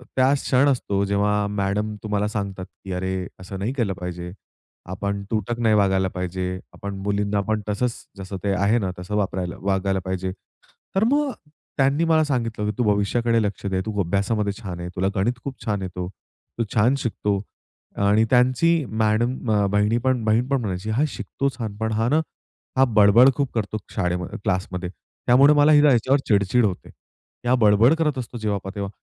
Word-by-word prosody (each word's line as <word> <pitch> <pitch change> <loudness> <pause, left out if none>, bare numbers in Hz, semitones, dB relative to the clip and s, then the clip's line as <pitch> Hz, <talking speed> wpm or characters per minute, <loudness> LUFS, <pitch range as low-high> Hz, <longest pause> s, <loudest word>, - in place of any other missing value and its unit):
त्याच 135 +2 +3
क्षण 130 +3 +3
असतो, 100 -7 0
जेव्हा 100 +1 +1
मॅडम 105 +1 -1
तुम्हाला 105 -1 0
सांगतात 100 -3 -4
की, 95 - -12
"अरे, 95 0 -2
असं 95 +1 -7
नाही 110 +7 -2
केलं 115 -8 -1
पाहिजे, 90 0 -5 0.6
आपण 100 +1 -3
तुटक 115 +2 -2
नाही 110 -2 +3
वागायला 95 -2 +2
पाहिजे, 90 0 -3 0.2
आपण 100 0 -6
मुलींना 100 0 0
पण 110 -1 0
तसंच, 120 +4 0 0.2
जसं 95 0 -6
ते 100 - +1
आहे 100 +5 +2
ना, 95 -3 -2
तसं 90 +3 -4
वापरायला 95 -3 -2
वागायला 95 0 0
पाहिजे." 95 0 -2 0.7
तर 195 - +4
मग 290 -2 +2 0.5
त्यांनी 140 +4 +3
मला 160 -1 +3
सांगितलं 115 -7 -2
की, - - -3
"तू 125 - +2
भविष्याकडे 115 +3 +1
लक्ष 100 0 -3
दे, 95 -1 0
तू 105 -2 -3
अभ्यासामध्ये 100 +3 0
छान 90 -3 -6
आहे, 85 - -5
तुला 95 +1 +1
गणित 120 +5 0
खूप 135 -2 -7
छान 105 -2 -1
येतो, 90 -1 -5 0.5
तू 115 - +1
छान 115 +5 +4
शिकतो" 105 -4 -1 0.7
आणि 110 +2 +4
त्यांची 130 +6 +3 0.2
मॅडम 120 +3 0
अ, 105 -1 +3
बहिणी 105 +3 +2
पण 125 -2 0
बहीण 110 +3 +2
पण 135 -2 +1
म्हणायची, 100 -1 -3
"हा 125 +8 +2
शिकतो 140 -1 -3
छान. 110 -4 -4
पण 110 +1 -2
हा 110 +2 +1
ना, 150 +5 +3 0.6
हा 130 - +6
बडबड 110 +3 +6
खूप 140 -3 -1
करतो 110 -1 -2
शाळेमध्ये 90 -3 -2
क्लासमध्ये 90 -1 -2
त्यामुळे 130 +9 +3
मला 145 +1 +5
आहे 150 -1 +7
ना, 150 -2 +5
याच्यावर 130 +4 +3
चिड-चिड 105 +3 +3
होते, 95 -3 -3 0.6
हा 130 - +4
बडबड 110 +4 +5
करत 150 -4 +1
असतो, 120 -1 -5
जेव्हा 105 -2 -1
पाहा 95 - -7
तेव्हा 100 -1 -3
105 Hz, 180 wpm, -23 LUFS, 95-120 Hz, 0.7 s, आहे